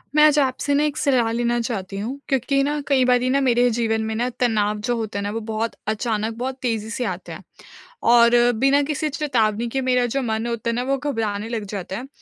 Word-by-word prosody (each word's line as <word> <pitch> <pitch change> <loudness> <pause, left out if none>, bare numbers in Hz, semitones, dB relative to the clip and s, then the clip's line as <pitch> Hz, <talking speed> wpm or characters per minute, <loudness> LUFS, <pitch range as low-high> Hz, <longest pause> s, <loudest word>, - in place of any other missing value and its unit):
मैं 300 - +6
आज 300 -1 +5
आपसे 275 +1 0
ना, 285 +1 +3
एक 300 0 -1
सलाह 250 -5 +2
लेना 240 +1 0
चाहती 195 -5 -4
हूँ, 250 +7 -4
क्योंकि 275 +1 +1
ना, 295 +1 -1
कई 265 -3 +3
बारी 250 0 +3
ना 275 +2 +2
मेरे 245 -2 +3
जीवन 225 -1 0
में 220 - -3
ना, 240 +3 0
तनाव 215 -3 +1
जो 245 - +1
होते 220 -3 -4
है 200 - -2
ना, 205 - -2
वो 225 - -3
बहुत 225 +1 -2
अचानक, 220 0 -1
बहुत 260 +2 -3
तेज़ी 225 -3 -2
से 245 +2 -3
आते 185 - -12
है - - -8 0.7
और 235 0 +6 0.2
बिना 275 +5 +3
किसी 300 +1 -2
चेतावनी 240 -6 0
के 270 - 0
मेरा 250 -1 +2
जो 275 - 0
मन 220 0 -2
होता 235 -1 -2
है - - 0
ना, 245 - -1
वो 275 +2 0
घबराने 225 -6 -3
लग 230 -2 -3
जाता 195 -1 -5
है 250 +4 -7
240 Hz, 230 wpm, -22 LUFS, 220-265 Hz, 0.7 s, मैं